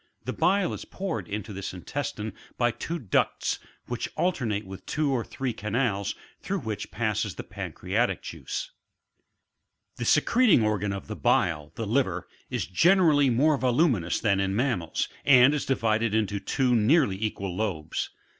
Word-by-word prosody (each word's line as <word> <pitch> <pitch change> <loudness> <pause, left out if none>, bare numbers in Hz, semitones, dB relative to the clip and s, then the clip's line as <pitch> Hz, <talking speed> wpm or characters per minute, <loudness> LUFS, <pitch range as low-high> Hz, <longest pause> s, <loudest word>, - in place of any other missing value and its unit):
The - - -2
bile 195 -1 +2
is - - -6
poured 170 - -4
into 105 0 -5
this 95 -1 -5
intestine 110 +1 -4 0.2
by 120 -1 +3
two 165 +8 -4
ducts, 115 - 0 0.3
which 120 -1 -3
alternate 120 - 0
with 95 0 -9
two 150 -1 0
or 125 -3 0
three 130 0 -3
canals, 105 -2 -1 0.2
through 195 -2 -3
which 110 -3 -4
passes 110 -2 -1
the - - -6
pancreatic - - -2
juice. - - -5 1.3
33. - - -10
The - - +1
secreting 205 - +4
organ 105 -1 0
of 100 -1 -5
the - - -6
bile, 75 -3 +1
the 115 - -3
liner 105 -6 +1
^ - - -22 0.3
is - - -2
generally 155 - +4
more 140 +4 +3
yduminous 125 - +2
than 100 -3 +2
in 95 0 0
mammals, 110 - 0 0.2
and 130 0 +7
is 150 - -2
divided 115 -3 +1
into 105 -2 0
two 125 +5 +1
nearly 110 - +3
equal 100 -4 -3
lobes. 95 -7 -2
115 Hz, 155 wpm, -27 LUFS, 100-140 Hz, 1.3 s, and